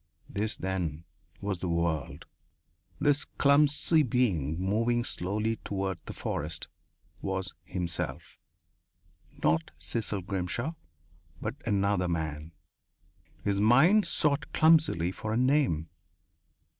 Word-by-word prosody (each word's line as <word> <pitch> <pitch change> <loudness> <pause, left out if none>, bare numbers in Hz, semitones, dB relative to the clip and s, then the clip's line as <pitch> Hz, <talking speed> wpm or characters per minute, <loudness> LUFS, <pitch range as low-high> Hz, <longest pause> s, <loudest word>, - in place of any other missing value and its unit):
This, 105 -1 -2
then, 90 -4 -3 0.4
was 100 -3 -2
the 90 - -3
world. 85 -4 -1 0.7
This 145 0 +3
clumsy 150 +3 +3
being, 100 - +1
moving 115 +5 +1
slowly 105 +3 -1
toward 95 -2 -3
the - - -5
forest, - - -4 0.5
was 95 -1 -2
himself 85 -2 -4 1.0
not 80 +1 +2
Cecil 105 -4 -1
Grimshaw 95 - -2 0.7
but - - -3
another 100 -2 +2
man. 80 -2 -3 0.9
His 100 -1 +1
mind 155 - +5
sought 140 -2 +1
clumsily 155 - +4
for 110 +3 -4
a - - +1
name. 130 - +2
100 Hz, 100 wpm, -29 LUFS, 85-125 Hz, 1.0 s, mind